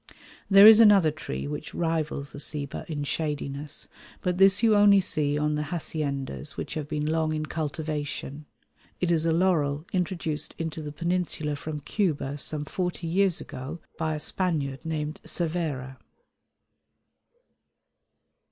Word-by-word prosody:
There 195 0 +9
is 220 0 +10
another 200 -8 +7
tree 155 -1 -5
which 150 +1 -6
rivals 160 -4 -2
the - - -9
ceiba 145 0 -3
in 145 -2 -3
shadiness, 145 -1 -3 0.3
but 180 -1 -1
this 195 +3 +5
you 220 -2 +5
only 205 -1 +7
see 150 -5 +1
on 150 0 +1
the 150 - -1
haciendas 145 - -3
which - - -5
have 155 -2 -4
been 150 -1 -2
long 155 0 0
in 155 0 -2
cultivation. 150 -2 -4 0.5
It 180 -1 +1
is 165 -1 +2
a - - +3
laurel 160 -4 +1
introduced 170 -4 -2
into 160 -1 -4
the 150 -1 -6
Peninsula 170 -2 -1
from 150 +1 -6
Cuba 145 -6 -1
some 150 +1 -2
forty 180 +2 -3
years 180 +1 +2
ago 140 +4 -7 0.2
by 160 -1 0
a - - -4
Spaniard 150 -5 -2
named 155 -1 -3
Cervera. 155 -7 -3
155 Hz, 140 wpm, -27 LUFS, 145-175 Hz, 0.5 s, is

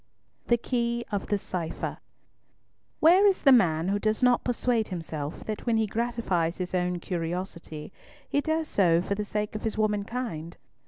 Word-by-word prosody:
THE 240 - +4
KEY 235 0 -1
OF 205 -2 -2
THE 205 - +1
CIPHER 175 -4 -4 1.0
Where 365 +6 +7
is 390 - +2
the 275 - +7
man 175 -8 +4
who 200 +1 +1
does 215 +3 0
not 250 -1 +4
persuade 240 -2 +1
himself 160 -5 -5
that 215 +2 -5
when 230 -1 +3
he 220 - +2
gratifies 215 -7 -1
his 180 -1 -4
own 180 -1 0
curiosity 170 -2 -5 0.3
he 285 - +1
does 315 +1 -1
so 175 -7 +3
for 200 - -1
the 210 +1 -2
sake 210 0 -2
of 215 - -4
his 220 -1 -3
womankind? 210 -5 -2
210 Hz, 165 wpm, -27 LUFS, 175-235 Hz, 1.0 s, Where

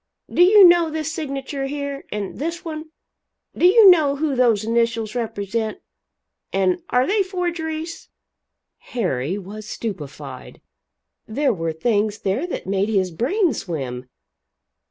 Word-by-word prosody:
Do - - +3
you 385 +1 +9
know 345 -2 +4
this 310 -1 -3
signature 275 -2 -4
here? 280 0 -5
and 205 -2 -5
this 335 +4 -4
one? 315 -1 -6 0.7
Do 350 - +5
you 425 +2 +7
know 310 -6 +6
who 290 -1 -1
those 235 -4 +3
initials 230 -1 0
represent 220 -1 -3 0.7
and 190 -2 +1
are 250 +1 +3
they 410 +6 +2
forgeries?" 340 -3 -4 0.7
Harry 180 - -2
was 205 +2 -9
stupefied. 145 - -7 0.7
There 270 +3 +1
were 165 -4 -2
things 210 +5 0
there 215 - -1
that - - -5
made 195 +2 0
his 190 -4 +1
brain 310 - +1
swim. 130 - -5
245 Hz, 130 wpm, -21 LUFS, 200-315 Hz, 0.7 s, you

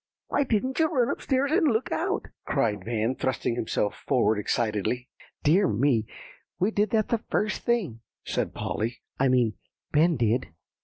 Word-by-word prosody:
"Why - - +2
didn't 255 +4 0
you 320 - +5
run 265 -4 +1
up - - -4
stairs, 275 +1 +1
and 330 0 +4
look 225 +2 -1
out?" 385 +5 -1 0.2
cried 110 -9 0
Van, 115 +2 0
thrusting 130 -2 -1
himself 110 -3 -1
forward 110 -5 +3
excitedly. 110 +3 -1 0.3
"Dear 180 +6 +4
me, 115 -2 +2 0.5
we 195 +5 +1
did 210 -1 +1
that 215 0 +1
the 235 - +1
first 210 -1 0
thing," 210 - 0 0.3
said - - -2
Polly; 115 +3 -3 0.2
"I 135 - +4
mean, 125 -4 +3 0.4
Ben 160 +3 +4
did. 120 +2 +1
140 Hz, 160 wpm, -27 LUFS, -, 0.5 s, you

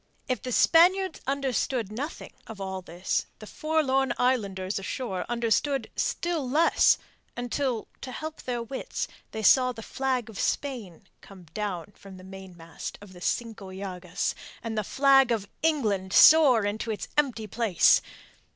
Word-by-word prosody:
If 255 -2 -1
the 255 - -5
Spaniards 360 +6 +4
understood 265 -5 -1
nothing 280 +9 -6
of 220 -3 -9
all 190 -1 -4
this, 175 +1 -2
the 215 - -11
forlorn 270 -2 0
islanders 200 -7 0
ashore 195 -1 -4
understood 240 +2 0
still 330 -7 -1
less, 315 +5 +4 0.4
until 245 -1 -2
to 260 - -6
help 315 +4 -6
their 240 -2 -3
wits 265 - -4 0.2
they 220 - -6
saw 255 +5 +5
the 225 -2 -9
flag 260 -2 -2
of 220 -3 -9
Spain 235 - -3 0.2
come 190 -2 -14
down 205 -3 -4
from 195 -1 -13
the 185 - -13
mainmast 185 -4 -9
of 200 -2 -14
the 180 - -13
Cinco 215 -3 -3
Llagas, 185 -2 -4 0.3
and 225 -1 -4
the 215 - 0
flag 270 +2 +4
of 215 -3 -1
England 215 -12 0
soar 285 -8 +7
to 210 +3 -3
its 215 - -3
empty 255 -7 +1
place. 210 -4 +3
230 Hz, 145 wpm, -27 LUFS, 195-270 Hz, 0.4 s, soar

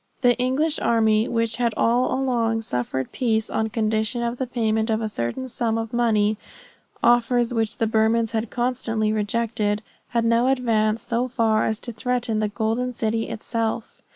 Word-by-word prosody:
The 245 -2 +4
English 285 +5 +1
army, 220 -1 +2
which 230 -2 0
had 235 -3 0
all 240 +2 +2
along 235 -4 0
offered 125 +1 -2
peace 220 -3 0
on 220 0 0
condition 220 +1 0
of 235 +1 -2
the 260 - -1
payment 220 -2 0
of 220 0 +1
a 220 - -2
certain 205 - -3
sum 230 -2 -1
of 225 0 -4
money, 215 -3 +2 0.7
offers 240 0 +3
which 225 -1 -1
the 225 - +1
Burmans 225 +1 +2
had 225 -1 -2
constantly 230 -3 -1
rejected, 215 0 -1 0.2
had 235 -1 0
now 230 +2 +3
advanced 230 -4 +1
so 235 +2 0
far 225 -3 +1
as 220 0 -1
to 240 - -3
threaten 240 -1 -1
the 215 - +1
golden 225 +4 -1
city 225 0 -1
itself. 225 0 -3
230 Hz, 165 wpm, -23 LUFS, 220-240 Hz, 0.7 s, The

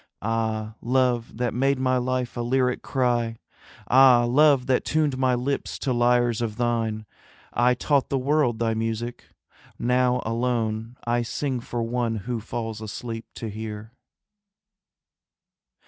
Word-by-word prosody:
Ah, 110 -1 -1
Love 125 -2 0
that 120 -1 -1
made 135 +3 +2
my 130 0 +1
life 125 0 -2
a 120 - -2
lyric 125 +1 +1
cry, 120 -3 0 0.5
Ah, 130 -2 +6
Love 140 0 +4
that 130 -1 +1
tuned 155 -3 +1
my 130 -1 +2
lips 135 +3 -2
to 130 - -1
lyres 120 -1 +2
of 110 -3 -2
thine, 115 -2 -1 0.5
I 125 +1 +3
taught 140 +2 +1
the 135 - +1
world 135 -3 +1
thy 115 0 0
music, 115 +2 -3 0.5
now 125 +1 +2
alone 115 0 -1
I 120 0 +1
sing 130 +2 -2
for 120 0 -4
one 115 0 -1
who 120 -1 -2
falls 110 0 -5
asleep 115 +2 -6
to 115 - -5
hear. 110 +1 -7
120 Hz, 135 wpm, -25 LUFS, 115-130 Hz, 0.5 s, Ah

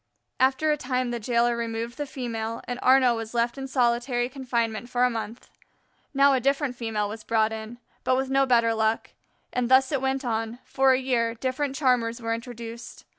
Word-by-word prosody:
After 265 +4 +3
a 300 - +1
time 250 -2 -1
the 240 - -3
jailer 235 +1 +1
removed 230 +2 -4
the 290 - -2
female, 230 -4 -4
and 245 0 -4
Arnaux 255 -2 +5
was 225 +1 -6
left 235 0 +1
in 270 -1 -5
solitary 245 -1 +1
confinement 240 -4 -2
for 245 0 +1
a 250 - +3
month. 225 0 -6 0.6
Now 275 0 +5
a 260 - +3
different 275 0 0
female 220 -3 -2
was 215 +1 -7
brought 220 -1 +1
in, 220 +2 -7 0.3
but 255 - +2
with 265 0 -2
no 270 0 +3
better 230 -2 +3
luck; 220 0 0 0.4
and 250 -1 0
thus 260 +1 +5
it 275 -3 0
went 265 0 -1
on 225 0 -2
for 270 0 +3
a 255 - +2
year 235 -3 0
different 265 +3 -2
charmers 250 -4 +1
were 230 -1 -2
introduced. 230 0 -8
240 Hz, 190 wpm, -26 LUFS, 230-265 Hz, 0.6 s, Arnaux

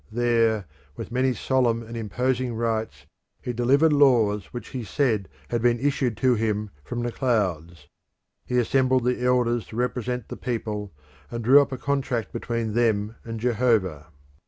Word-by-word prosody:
There 115 -3 +2 0.3
with - - -7
many 130 +2 +2
solemn 120 -3 +1
and 115 +1 -9
imposing 125 +2 -1
rites 110 -10 -2 0.3
he 125 - -4
delivered 140 +7 +3
laws 115 -8 +4
which 120 - -8
he 125 -2 -5
said 110 -4 0 0.2
had 120 -1 -1
been 120 0 +2
issued 130 -4 0
to 130 -1 +3
him 105 -2 -1
from 120 +10 -4
the 120 - -2
clouds. 90 - -1 0.6
He 125 - -2
assembled 130 +1 +2
the 125 0 0
elders 120 -2 +1
to - - -10
represent 125 -1 -2
the - - -6
people, 105 -4 -4 0.4
and 115 -1 -5
drew 135 +5 +7
up 140 - -2
a 130 - -3
contract 130 -6 -2
between 115 -2 -3
them 110 -2 +1
and 115 -1 -6
Jehovah. 110 - +1
120 Hz, 160 wpm, -25 LUFS, 110-125 Hz, 0.6 s, drew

